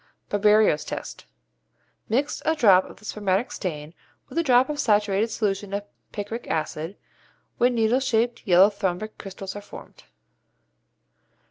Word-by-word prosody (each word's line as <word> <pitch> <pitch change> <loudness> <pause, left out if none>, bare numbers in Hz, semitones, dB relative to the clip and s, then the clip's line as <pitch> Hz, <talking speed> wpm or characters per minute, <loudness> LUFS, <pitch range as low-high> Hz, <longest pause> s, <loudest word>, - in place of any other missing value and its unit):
Barberio's 210 -5 +3
Test. - - -7 0.8
Mix 270 +7 0
a 320 - +1
drop 195 -10 +5
of - - -13
the 210 - -17
spermatic 205 +1 -1
stain 155 -4 -5 0.4
with - - -9
a - - +4
drop 255 -4 +4
of 300 -1 -4
a - - -8
saturated 210 -4 +2
solution 200 -2 -2
of 200 - -3 0.3
picric 215 +3 -6
acid, 160 +3 -3 0.6
when 245 +1 +3
needle 230 +2 +2
shaped 240 -2 0
yellow 190 +3 +6
rhombic 190 +3 -2
crystals 195 0 -7
are 205 - -6
formed. 205 - -13
210 Hz, 140 wpm, -24 LUFS, 190-235 Hz, 0.8 s, yellow